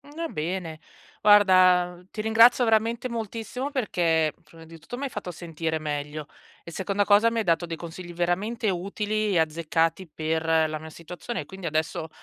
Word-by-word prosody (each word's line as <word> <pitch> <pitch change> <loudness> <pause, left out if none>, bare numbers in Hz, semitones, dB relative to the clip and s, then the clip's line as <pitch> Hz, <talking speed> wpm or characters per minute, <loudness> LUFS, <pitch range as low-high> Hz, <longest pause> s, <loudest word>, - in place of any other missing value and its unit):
Va 330 +1 -3
bene. 165 - -4 0.4
Guarda, 185 -4 +5
ti 215 - -9
ringrazio 230 +3 +5
veramente 230 +2 +1
moltissimo 235 +4 -5
perché 165 - +1
prima 165 +1 -15
di 165 +1 -12
tutto 165 +10 -9
mi 280 - -5
hai 275 - -3
fatto 200 -6 -6
sentire 165 -1 -4
meglio 150 0 -4 0.4
e 170 - -8
seconda 200 +3 -1
cosa 210 +3 +5
mi 230 - -3
hai 220 - 0
dato 170 0 +2
dei 165 -1 -5
consigli 175 +1 -8
veramente 195 +6 -1
utili 210 +4 -2
e 170 - +3
azzeccati 165 +2 0
per 160 +1 -1 0.2
la 155 0 -4
mia 160 +1 -10
situazione 175 +8 -7
e - - -9
quindi 190 -2 -7
adesso 160 +1 -2
180 Hz, 170 wpm, -26 LUFS, 160-215 Hz, 0.4 s, Guarda